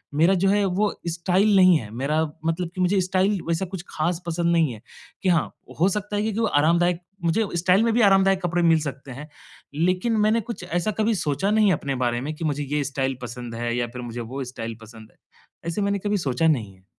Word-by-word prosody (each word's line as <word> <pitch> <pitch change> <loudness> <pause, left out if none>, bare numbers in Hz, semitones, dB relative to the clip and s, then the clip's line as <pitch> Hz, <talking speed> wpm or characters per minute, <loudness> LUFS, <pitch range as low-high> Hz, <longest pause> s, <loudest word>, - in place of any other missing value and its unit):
मेरा 165 +6 +4
जो 190 +1 +1
है 205 +1 +3
वो 195 +3 +1 0.2
स्टाइल 185 +5 +2
नहीं 185 -2 +6
है, 105 - -9
मेरा 145 +5 0 0.2
मतलब 165 +1 -1
कि 185 - -2
मुझे 190 +2 +2
स्टाइल 190 +2 +1
वैसा 170 +3 0
कुछ 185 -1 -7
ख़ास 165 +3 -2
पसंद 170 0 0
नहीं 160 -6 +2
है, 110 - -12 0.4
कि 190 - +2
हाँ 170 -3 +3 0.3
हो 180 - +4
सकता 210 +1 -3
है - - +1
क्योंकि 215 0 -2
वो 230 - +2
आरामदायक 170 +2 +2 0.3
मुझे 190 +7 +2
स्टाइल 180 +4 +3
में 230 -1 +2
भी 240 - +3
आरामदायक 195 -2 +4
कपड़े 175 0 0
मिल 165 -1 +5
सकते 140 -2 -6
हैं, 140 +5 -8 0.5
लेकिन 180 +8 +1
मैंने 225 +2 +2
कुछ 200 - -8
ऐसा 175 +3 -1
कभी 220 +1 +2
सोचा 155 +3 -1
नहीं 215 0 +4
है 190 - +4
अपने 140 -3 -2
बारे 120 0 -1
में 150 +4 -4
कि 160 - -5
मुझे 145 -1 -1
ये 150 - +1
स्टाइल 135 -1 -2
पसंद 120 -1 -7
है 120 0 -2
या 120 -1 0
फिर 125 - -6
मुझे 120 0 -6
वो 130 +4 -5
स्टाइल 115 -2 -6
पसंद 110 -1 -13
है। - - -33 0.5
ऐसे 170 +5 -2
मैंने 200 0 0
कभी 205 +1 -1
सोचा 130 +5 +1
नहीं 115 -11 0
है। 95 0 -27
170 Hz, 230 wpm, -24 LUFS, 140-195 Hz, 0.5 s, नहीं